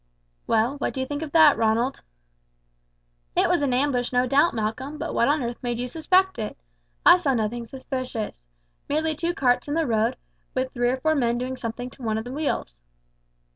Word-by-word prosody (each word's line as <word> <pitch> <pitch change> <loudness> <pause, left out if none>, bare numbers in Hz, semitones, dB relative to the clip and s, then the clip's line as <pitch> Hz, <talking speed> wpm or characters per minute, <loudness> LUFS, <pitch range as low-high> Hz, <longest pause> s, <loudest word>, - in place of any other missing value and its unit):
"Well, 230 +5 +1
what - - -2
do - - -3
you 260 - 0
think 290 +2 -4
of 315 -3 -5
that, 315 -3 +6
Ronald?" 230 +4 +1 1.3
"It - - +3
was 350 - +2
an 280 -3 +1
ambush, 250 -1 +1
no 250 0 +2
doubt, 280 +5 +3
Malcolm; 250 +7 -3
but - - -4
what 235 - +3
on 290 -1 +2
earth 235 0 -4
made 240 -1 -2
you 245 +1 -3
suspect 370 +4 +2
it? 215 - -4 0.5
I - - +9
saw 285 -7 0
nothing 230 +1 -2
suspicious. 255 - -5 0.5
Merely 310 +2 +1
two 335 +3 -2
carts 250 -2 +2
in 290 - -2
the 325 -1 +1
road, 230 0 +1 0.4
with 260 0 -1
three 245 -1 +1
or 255 - 0
four 315 +4 +1
men 240 -5 +1
doing 255 +1 -3
something 245 +1 -5
to 265 - -17
one 220 -2 -1
of 220 - -3
the 250 - -6
wheels." 275 - -3
255 Hz, 200 wpm, -25 LUFS, 235-290 Hz, 1.3 s, I